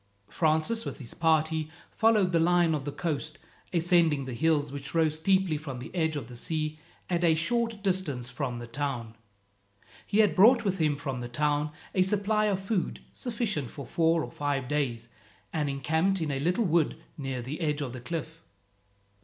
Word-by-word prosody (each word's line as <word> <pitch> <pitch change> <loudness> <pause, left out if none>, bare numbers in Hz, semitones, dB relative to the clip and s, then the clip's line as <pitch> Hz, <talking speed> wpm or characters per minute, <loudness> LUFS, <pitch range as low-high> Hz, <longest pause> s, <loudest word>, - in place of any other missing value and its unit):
Francis, 160 +8 +1
with - - -5
his 130 -6 -9
party, 160 -1 +1 0.2
followed 215 -5 +3
the 170 - +3
line 175 0 +4
of 145 -3 -2
the 145 - -2
coast, 155 -1 -3 0.3
ascending 165 -5 +3
the 130 - -5
hills 150 +1 +1
which 140 +2 -6
rose 160 -2 +2
steeply 190 -1 +2
from 145 -4 -6
the 125 - -8
edge 160 -3 0
of 140 -5 -3
the 120 +1 -11
sea 155 +4 -2 0.3
at 175 -1 0
a 165 -2 +5
short 230 +5 -1
distance 180 -11 -1
from 125 -4 -3
the 120 - -6
town. 120 -3 -4 0.9
He 200 - 0
had 210 -7 +4
brought 230 +4 +6
with 190 -2 0
him 155 -2 +2
from 135 -3 -4
the 120 0 -5
town 150 +3 +1 0.2
a 185 - +3
supply 210 +2 +2
of 200 -3 +1
food 195 -1 -2
sufficient 215 - -2
for 140 -3 -8
four 165 +2 +2
or - - -7
five 140 -3 -2
days, 125 -5 -1 0.5
and 150 -3 0
encamped 160 +8 +1
in 160 -3 -1
a 135 - -1
little 180 - +1
wood 170 -3 +2 0.2
near 135 -5 -4
the 145 +7 -5
edge 150 -2 0
of 130 -4 -4
the 125 - -7
cliff. 160 +4 -5
160 Hz, 185 wpm, -28 LUFS, 140-180 Hz, 0.9 s, brought